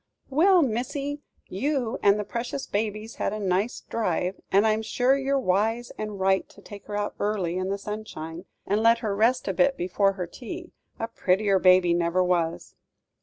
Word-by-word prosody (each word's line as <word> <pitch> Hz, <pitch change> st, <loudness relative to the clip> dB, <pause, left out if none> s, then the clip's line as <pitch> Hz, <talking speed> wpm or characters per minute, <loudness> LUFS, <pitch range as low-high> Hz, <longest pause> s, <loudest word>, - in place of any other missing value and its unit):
"Well, 350 Hz, +5 st, +5 dB
missy, 280 Hz, +4 st, -2 dB, 0.3 s
you 250 Hz, +3 st, -1 dB
and 200 Hz, 0 st, +5 dB
the -, -, -1 dB
precious 240 Hz, +6 st, -4 dB
baby's 215 Hz, +1 st, -3 dB
had -, -, -1 dB
a 215 Hz, -, -4 dB
nice 195 Hz, +3 st, 0 dB
drive; 185 Hz, -4 st, -2 dB
and 200 Hz, +3 st, +4 dB
I'm 215 Hz, 0 st, +2 dB
sure 245 Hz, +4 st, +2 dB
you're 275 Hz, 0 st, 0 dB
wise 225 Hz, +1 st, 0 dB
and 210 Hz, -2 st, -5 dB
right 190 Hz, 0 st, +2 dB
to -, -, -17 dB
take 200 Hz, 0 st, -12 dB
her 205 Hz, -1 st, -3 dB
out 205 Hz, 0 st, -2 dB
early, 200 Hz, -5 st, -1 dB
in 185 Hz, +1 st, -2 dB
the 200 Hz, -, -1 dB
sunshine, 195 Hz, -5 st, -7 dB, 0.2 s
and 205 Hz, +2 st, +1 dB
let 230 Hz, +1 st, +5 dB
her 200 Hz, -2 st, 0 dB
rest 235 Hz, +5 st, +2 dB
a -, -, 0 dB
bit 270 Hz, 0 st, +2 dB
before 195 Hz, +2 st, +1 dB
her 185 Hz, -2 st, -4 dB
tea 335 Hz, -, -8 dB, 0.3 s
a 225 Hz, -, -3 dB
prettier 195 Hz, -2 st, +1 dB
baby 185 Hz, -1 st, +5 dB
never 170 Hz, +1 st, +2 dB
was." 170 Hz, -2 st, -1 dB
210 Hz, 180 wpm, -26 LUFS, 185-240 Hz, 0.3 s, Well